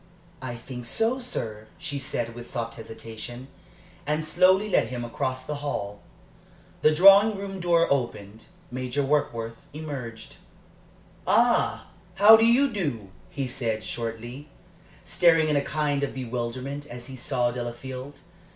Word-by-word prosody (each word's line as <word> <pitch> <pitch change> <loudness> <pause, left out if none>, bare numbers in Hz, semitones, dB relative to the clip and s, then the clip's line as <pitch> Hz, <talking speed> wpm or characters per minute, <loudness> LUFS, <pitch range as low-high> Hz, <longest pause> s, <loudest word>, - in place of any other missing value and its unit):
"I 130 -2 -5
think 125 0 -8
so, 230 - +1
sir," 110 - -5
she 145 -1 -4
said, 120 -3 -3
with 120 0 -9
soft 115 -1 -3
hesitation, 115 +3 -9 0.6
and 150 +1 +1
she 155 - -3
slowly 190 +3 +4
led 195 - +2
him 120 0 -4
across 130 +2 -3
the 150 +1 -3
hall. 105 -8 -4 0.8
The 155 - +5
drawing 195 +4 +7
room 195 -1 -5
door 170 -1 +3
opened. 110 -5 -2 0.3
Major 130 +2 -2
Warkworth 115 -5 -1 0.2
emerged. 135 -7 -7 0.9
"Ah, - - +3 0.3
how 205 +3 +9
do 225 0 +4
you 265 +3 +4
do?" 140 - -3 0.2
he 135 -2 -3
said, 115 -4 -2
shortly, 120 +5 -5 0.6
staring 165 -3 +4
in 150 - +2
a 140 - +3
kind 145 -1 -1
of 140 - -2
bewilderment 130 +3 -4
as 120 0 -9
he 130 +1 -8
saw 125 -1 0
Delafield. 130 +3 -6
130 Hz, 140 wpm, -26 LUFS, 120-155 Hz, 0.9 s, how